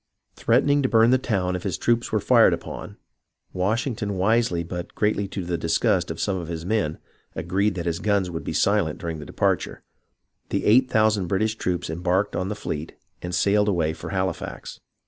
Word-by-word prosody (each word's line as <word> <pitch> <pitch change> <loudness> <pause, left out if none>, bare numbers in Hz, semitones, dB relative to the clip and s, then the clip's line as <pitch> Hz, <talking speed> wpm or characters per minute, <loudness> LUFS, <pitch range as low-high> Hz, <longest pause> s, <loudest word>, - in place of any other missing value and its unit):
Threatening 145 +4 +3
to 130 - +1
burn 115 +1 +5
the 130 - +4
town 95 -7 -1
if 90 - -4
his 95 -1 -2
troops 120 0 0
were - - +2
fired - - +5
upon - - -7 0.6
(Washington, 105 +1 -1
wisely 100 -3 +2
but 85 +1 -7
greatly 105 -1 0
to 95 -1 -5
the 85 -1 -2
disgust 90 +2 +1
of 80 - -5
some 100 -2 0
of 85 -3 -5
his 85 -1 -5
men, 90 -7 0 0.4
agreed 95 +4 0
that 85 -1 -4
his 85 -1 -1
guns 100 -3 +1
would 85 -2 -5
be - - -4
silent - - +1
during 80 -2 -5
the 75 - -9
departure), - - -1 0.7
the - - -1
eight 125 +5 +5
thousand 110 -5 +2
Brit 95 +4 +1
ish 110 0 0
troops 90 -5 -2
embarked 90 +4 0
on 95 +1 -2
the 105 - -3
fleet 80 -6 -5 0.3
and 90 0 -4
sailed 105 +4 +3
away 85 -5 +1
for - - -8
Hali 95 -1 0
fax. - - -8
95 Hz, 195 wpm, -24 LUFS, 85-110 Hz, 0.7 s, burn